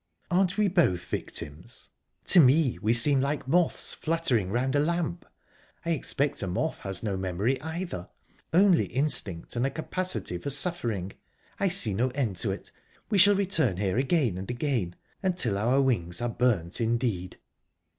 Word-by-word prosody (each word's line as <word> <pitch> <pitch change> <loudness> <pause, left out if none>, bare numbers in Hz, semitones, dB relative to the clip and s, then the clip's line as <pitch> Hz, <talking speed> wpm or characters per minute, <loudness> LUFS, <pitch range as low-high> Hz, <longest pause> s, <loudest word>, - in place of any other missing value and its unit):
"Aren't 185 +2 +1
we 210 -1 +3
both 160 - +1
victims? 80 +11 -6 0.3
To 185 - +5
me 135 - +4
we 110 +2 +1
seem 130 +4 +5
like 140 0 -2
moths 170 +4 +3
fluttering 155 - -1
round 130 +5 0
a - - +3
lamp. 170 +2 -2 0.6
I 170 - 0
expect 145 -2 0
a 95 - -3
moth 125 - -2
has 95 -1 -2
no 105 -3 -2
memory, 95 +8 -1
either 160 - -5 0.4
only 185 0 +4
instinct 125 - 0
and 120 - 0
a 135 - +1
capacity 165 - -3
for 140 - -5
suffering...I 135 - -3
see 170 - +2
no 120 +7 +1
end 115 -10 -1
to - - -1
it; - - -5 0.4
we 205 - +3
shall 205 +2 +7
return 165 - +1
here 100 +3 0
again 130 - +1
and 95 - -7
again, 120 - -2 0.3
until 180 - 0
our 120 +7 +1
wings 90 -11 0
are 120 - -2
burnt 115 -7 0
indeed!" 115 -6 -1
130 Hz, 155 wpm, -27 LUFS, 100-165 Hz, 0.6 s, shall